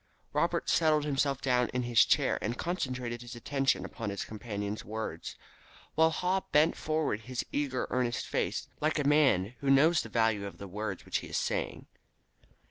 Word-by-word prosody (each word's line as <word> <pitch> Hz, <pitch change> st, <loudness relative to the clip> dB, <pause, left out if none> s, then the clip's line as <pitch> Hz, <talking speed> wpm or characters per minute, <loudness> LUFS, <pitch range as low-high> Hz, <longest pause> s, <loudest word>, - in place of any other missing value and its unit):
Robert -, -, +1 dB
settled 155 Hz, -2 st, +3 dB
himself 140 Hz, -1 st, 0 dB
down 125 Hz, -2 st, +2 dB
in 125 Hz, -, +1 dB
his 120 Hz, -2 st, +5 dB
chair -, -, +2 dB
and 120 Hz, +4 st, -2 dB
concentrated 125 Hz, -9 st, -3 dB
his 120 Hz, 0 st, -8 dB
attention 135 Hz, +3 st, 0 dB
upon 115 Hz, -4 st, -5 dB
his 100 Hz, 0 st, -4 dB
companion's 105 Hz, -2 st, -5 dB
words, 110 Hz, +1 st, -5 dB, 0.6 s
while 160 Hz, 0 st, +5 dB
Haw 180 Hz, +3 st, 0 dB
bent 150 Hz, +2 st, +4 dB
forward 155 Hz, -8 st, -1 dB
his 120 Hz, +3 st, -4 dB
eager, 140 Hz, -3 st, -1 dB
earnest 125 Hz, -2 st, 0 dB
face, -, -, -2 dB
like 155 Hz, +1 st, +1 dB
a 150 Hz, -, +1 dB
man 130 Hz, -9 st, +4 dB
who 140 Hz, -, -1 dB
knows 155 Hz, +4 st, +5 dB
the 115 Hz, -, -8 dB
value 110 Hz, -3 st, +1 dB
of 100 Hz, -, -10 dB
the 100 Hz, -, -8 dB
words 100 Hz, 0 st, -5 dB
which -, -, -1 dB
he -, -, -9 dB
is -, -, -2 dB
saying. -, -, -2 dB
125 Hz, 175 wpm, -30 LUFS, 110-150 Hz, 0.6 s, his